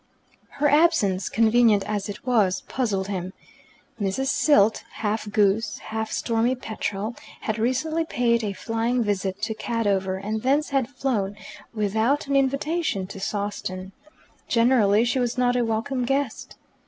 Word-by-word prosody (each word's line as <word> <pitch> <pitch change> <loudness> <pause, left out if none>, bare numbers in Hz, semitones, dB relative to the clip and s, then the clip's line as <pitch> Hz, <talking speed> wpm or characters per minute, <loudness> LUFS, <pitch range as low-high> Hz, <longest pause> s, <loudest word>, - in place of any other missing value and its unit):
Her 295 - +1
absence, 285 - +3
convenient 225 -2 +4
as 205 -1 -2
it 205 - -8
was, 210 -7 +2
puzzled 205 -7 -2
him. 185 -2 -4 0.7
Mrs. 205 +8 0
Silt, 220 -8 +3
half 215 0 -2
goose, 210 +2 +2
half 220 0 -4
stormy 230 +2 +1
petrel, 215 -2 -4 0.3
had 220 0 -2
recently 265 +8 0
paid 235 -6 +1
a 205 -2 -2
flying 230 +4 -1
visit 200 -1 -2
to 220 - 0
Cadover, 200 -5 -1
and 215 +3 -3
thence 280 +5 +1
had 270 -4 0
flown, 225 -8 -2 0.4
without 220 +6 0
an 280 0 -1
invitation, 275 - 0
to 195 +1 -9
Sawston. 195 -2 -4 0.6
Generally 230 -3 +4
she 255 +2 0
was 245 0 -1
not 245 0 +2
a 245 - +2
welcome 230 +3 -1
guest. 270 -1 -2
225 Hz, 140 wpm, -24 LUFS, 205-255 Hz, 0.7 s, convenient